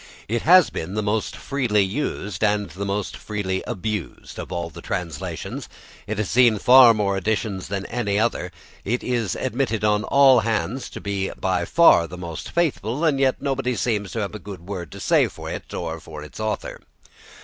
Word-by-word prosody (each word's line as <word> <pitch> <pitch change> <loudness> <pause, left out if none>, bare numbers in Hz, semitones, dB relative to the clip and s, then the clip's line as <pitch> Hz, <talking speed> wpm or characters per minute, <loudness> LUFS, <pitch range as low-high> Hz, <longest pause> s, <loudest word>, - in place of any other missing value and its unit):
It 115 +2 -1
has 180 +1 +6
been 90 +5 -5
the 105 - 0
most 105 +1 -1
freely 120 -7 +1
used 100 -3 -3
and 105 -1 +1
the 100 +2 -5
most 100 0 -2
freely 95 -3 -3
abused 105 - -5
of - - -7
all 85 -2 -3
the - - -10
translations. 85 -5 -5 0.4
It 110 0 -3
has 105 -2 -1
seen 120 -2 +4
far 125 +1 +8
more 100 -2 0
editions 100 0 -2
than 100 0 -3
any 105 -4 -1
other, 115 +1 0 0.3
it 120 +5 -1
is 115 -7 -1
admitted 125 -4 -1
on 105 0 +2
all 135 -3 +6
hands 115 +3 -2
to - - -9
be 100 -1 -2
by 90 -2 0
far 155 - +5
the 90 - -9
most 85 -3 -6
faithful, 150 - -1
and 145 -4 +2
yet 135 0 +1
nobody 135 -3 -1
seems 105 -5 -1
to 115 - -2
have 100 - -3
a 105 - -6
good 100 -2 -9
word 90 -6 -5
to - - -9
say - - +3
for - - -8
it - - -7
or 80 -1 -4
for 75 -2 -9
its 75 - -11
author. 110 -2 -3
105 Hz, 190 wpm, -23 LUFS, 95-120 Hz, 0.4 s, far